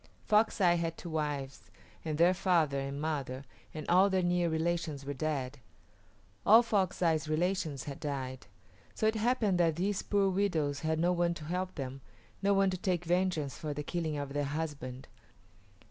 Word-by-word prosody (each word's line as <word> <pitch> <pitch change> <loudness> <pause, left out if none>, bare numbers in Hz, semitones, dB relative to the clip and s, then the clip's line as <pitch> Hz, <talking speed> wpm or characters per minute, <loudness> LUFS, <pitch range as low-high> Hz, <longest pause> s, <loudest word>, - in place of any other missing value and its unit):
Fox 215 +1 +3
Eye 175 -3 +4
had 165 -1 -2
two 170 - -7
wives, 145 -3 -3 0.3
and 155 -2 -2
their 175 +3 +5
father 170 -7 +2
and 135 +1 -4
mother 140 -4 -3 0.3
and 155 -1 -7
all 185 +3 +5
their 190 -1 +1
near 175 -1 +2
relations 160 -3 -1
were 145 - -3
dead. 140 -2 -3 0.8
All 225 +3 +7
Fox 195 -5 0
Eye's 160 -2 +2
relations 155 -4 0
had 140 +1 -7
died. 130 -3 -4 0.5
So - - -1
it 220 - +4
happened 220 -4 +1
that 165 -2 +3
these 190 +3 -1
poor 200 -1 +1
widows 165 -7 0
had 160 0 0
no 175 +2 +3
one 175 -1 +1
to 155 - -8
help 180 +3 -3
them 135 -2 -5 0.4
no 200 0 +2
one 195 -1 +3
to 185 - -3
take 180 -1 -1
vengeance 175 -5 0
for 150 -2 -4
the 150 - -3
killing 160 -1 -2
of 140 -1 -4
their 145 0 0
husband. 140 -4 -5
160 Hz, 175 wpm, -31 LUFS, 145-185 Hz, 0.8 s, All